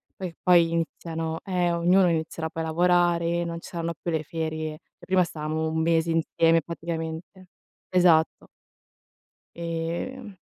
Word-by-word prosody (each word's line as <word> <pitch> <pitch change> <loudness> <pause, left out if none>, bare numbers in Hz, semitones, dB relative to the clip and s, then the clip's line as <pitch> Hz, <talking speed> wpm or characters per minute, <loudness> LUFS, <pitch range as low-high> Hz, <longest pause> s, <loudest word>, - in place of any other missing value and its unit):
poi 180 -3 -6
poi 170 -2 +5
iniziano 165 -1 -3
eh, 180 -2 0
ognuno 180 +2 +4
inizierà 160 0 -2
poi 165 0 -4
a - - -3
lavorare, 175 0 +2
non 170 0 -4
ci - - -10
saranno 170 -1 -3
più - - -3
le 160 -1 -1
ferie, 155 -1 -3
e - - -17 0.3
prima 185 -1 +3
stavamo 160 -1 -3
1 160 0 -1
mese 165 0 +2
insieme, 165 0 +3
praticamente. 165 +3 -6 0.4
Esatto. 175 -3 +3 1.1
Ehm. 170 +8 -4
165 Hz, 140 wpm, -26 LUFS, 160-175 Hz, 1.1 s, poi